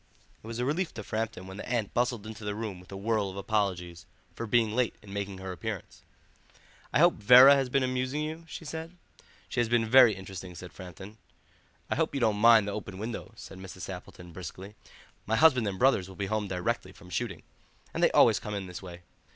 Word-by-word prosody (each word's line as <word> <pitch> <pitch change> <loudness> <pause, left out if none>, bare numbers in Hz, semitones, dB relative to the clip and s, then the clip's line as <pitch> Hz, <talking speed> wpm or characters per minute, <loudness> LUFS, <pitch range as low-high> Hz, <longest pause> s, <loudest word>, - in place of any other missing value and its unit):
It - - -11
was 115 0 -5
a 125 - -1
relief 165 +6 -1
to 110 - -6
Framton 110 -3 -3
when 95 +1 -9
the - - -7
aunt 115 -4 -1
bustled 120 -3 0
into 110 0 -8
the 105 0 -3
room 105 -4 -5
with 90 +1 -16
a 95 - -6
whirl 105 0 0
of 95 - -9
apologies 95 -5 -2 0.3
for 115 - -5
being 110 0 +3
late 120 +1 0
in 100 -1 -11
making 100 -1 -4
her 95 0 -6
appearance. 90 - -6 0.9
"I - - +2
hope - - +4
Vera 125 +6 +9
has 135 -2 +1
been 135 +1 +2
amusing 130 +3 -1
you?" 160 +2 -5
she 165 - -8
said. 160 +3 -7 0.5
"She - - -3
has 120 -2 +1
been 115 -1 +2
very 125 -2 +7
interesting," 95 -1 -8
said 90 +1 -10
Framton. 95 +4 -10 0.7
"I - - -2
hope 160 -2 0
you - - 0
don't 110 -4 +2
mind 115 -1 +6
the - - -2
open 100 -2 -6
window," 110 +3 -5
said 95 - -11
Mrs. 95 -1 -10
Sappleton 90 -1 -8
briskly; 95 +4 -8 0.5
"my 110 - +1
husband 125 -3 +5
and 95 -2 -3
brothers 120 -7 +3
will 95 - -11
be 100 - -3
home 105 +1 -1
directly 90 -2 -2
from 90 - -15
shooting, 100 -8 -3 0.5
and - - -2
they - - +6
always - - +5
come 105 -1 -5
in 100 -1 -4
this 90 -1 -8
way. 90 -2 -10
105 Hz, 215 wpm, -29 LUFS, 95-120 Hz, 0.9 s, Vera